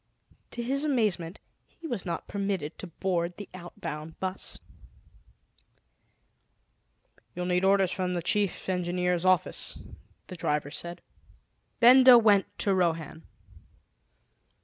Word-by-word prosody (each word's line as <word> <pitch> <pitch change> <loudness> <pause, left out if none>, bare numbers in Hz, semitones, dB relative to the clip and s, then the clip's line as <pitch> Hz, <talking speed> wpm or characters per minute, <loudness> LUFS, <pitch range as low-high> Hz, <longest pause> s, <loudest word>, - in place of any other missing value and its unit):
To 240 - -5
his 275 +4 0
amazement, 210 - 0 0.3
he 335 - -16
was 235 - -4
not 170 - -4
permitted 195 -6 -3
to 185 - -7
board 175 0 -2
the 205 - -8
outbound 160 -3 -8
bus. 190 0 -5 2.8
"You'll 180 - -3
need 180 0 +1
orders 195 -1 +3
from 180 -1 -2
the 175 - -3
Chief 200 +1 0
Engineer's 180 -1 -1
office," 185 -1 +1 0.5
the 185 - -9
driver 150 -4 -1
said. 170 +2 -6 0.8
Benda 255 +1 +8
went 210 -4 +4
to 200 - +2
Rohan. 165 -3 -1
185 Hz, 110 wpm, -28 LUFS, 170-205 Hz, 2.8 s, Benda